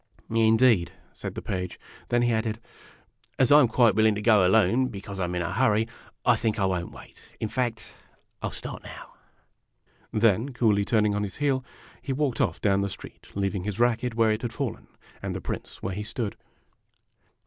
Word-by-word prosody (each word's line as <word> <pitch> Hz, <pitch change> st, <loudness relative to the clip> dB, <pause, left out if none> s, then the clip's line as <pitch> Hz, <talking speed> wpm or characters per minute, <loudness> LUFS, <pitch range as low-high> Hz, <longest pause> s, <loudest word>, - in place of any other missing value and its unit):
" -, -, -38 dB
Indeed! 110 Hz, -4 st, +4 dB
" -, -, -33 dB
said -, -, -7 dB
the -, -, -6 dB
Page. 90 Hz, -1 st, -4 dB, 0.3 s
Then 120 Hz, 0 st, +2 dB
he 120 Hz, -1 st, +2 dB
added, 110 Hz, 0 st, -1 dB, 0.8 s
"As 130 Hz, 0 st, +3 dB
I 145 Hz, -, +9 dB
'm 135 Hz, -, +5 dB
quite 115 Hz, -1 st, +4 dB
willing 110 Hz, +1 st, +3 dB
to 105 Hz, -, -3 dB
go 110 Hz, -4 st, +5 dB
alone, 110 Hz, +6 st, +3 dB
because 100 Hz, -4 st, -7 dB
I 90 Hz, -, +1 dB
'm 90 Hz, 0 st, -3 dB
in 90 Hz, -, -1 dB
a 85 Hz, -, -3 dB
hurry, 110 Hz, -1 st, +2 dB, 0.4 s
I 125 Hz, -, +5 dB
think 110 Hz, -1 st, -1 dB
I 100 Hz, -, +1 dB
won't 90 Hz, -2 st, -1 dB
wait. -, -, -14 dB, 0.2 s
In 110 Hz, -, -1 dB
fact, 115 Hz, -1 st, -3 dB, 0.5 s
I -, -, -1 dB
'11 -, -, -7 dB
start -, -, -7 dB
now." -, -, -11 dB, 1.0 s
Then, 115 Hz, +4 st, +2 dB
coolly 105 Hz, -4 st, +2 dB
turning 105 Hz, -2 st, +2 dB
on 105 Hz, -, -1 dB
his 100 Hz, -2 st, -4 dB
heel, 140 Hz, -3 st, +1 dB, 0.4 s
he 135 Hz, -, -3 dB
walked 135 Hz, -4 st, 0 dB
off -, -, 0 dB
down 100 Hz, -1 st, +2 dB
the 100 Hz, -, -1 dB
street, -, -, -11 dB
leaving 100 Hz, -1 st, -1 dB
his 105 Hz, +1 st, -4 dB
racket 120 Hz, 0 st, +1 dB
where 115 Hz, -1 st, +3 dB
it 110 Hz, +1 st, -1 dB
had 120 Hz, -2 st, -4 dB
fallen, 135 Hz, -4 st, -4 dB, 0.3 s
and -, -, -4 dB
the -, -, -3 dB
Prince -, -, -6 dB
where 95 Hz, -, -2 dB
he 105 Hz, -, -4 dB
stood. 110 Hz, -1 st, -4 dB
110 Hz, 205 wpm, -26 LUFS, 100-120 Hz, 1.0 s, I